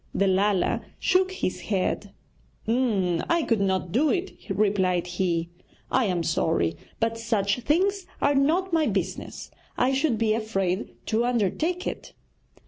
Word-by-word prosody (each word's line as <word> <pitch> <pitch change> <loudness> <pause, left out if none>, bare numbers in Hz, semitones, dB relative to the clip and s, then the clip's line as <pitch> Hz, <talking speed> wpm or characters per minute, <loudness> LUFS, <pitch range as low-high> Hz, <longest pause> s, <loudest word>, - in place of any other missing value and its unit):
The 200 - +3
Lala 195 0 +2 0.2
shook 375 0 +2
his 375 - -3
head. 200 0 -1 0.6
'I 225 - +1
could 225 -4 +2
not 190 -3 0
do 280 - +3
it,' 365 +4 -1 0.2
replied 190 -3 +1
he. 175 -2 -1 0.4
'I 260 - +3
am 180 -4 0
sorry; 125 - +1 0.2
but 225 0 0
such 220 -2 0
things 370 +8 +1
are 285 - +3
not 330 +7 +2
my 320 -2 +3
business. - - -3 0.3
I 255 +2 +2
should 270 -3 +1
be 220 -1 +2
afraid 195 -4 -2
to 225 +1 +1
undertake 250 - 0
it.' - - -5
220 Hz, 135 wpm, -26 LUFS, 190-285 Hz, 0.6 s, The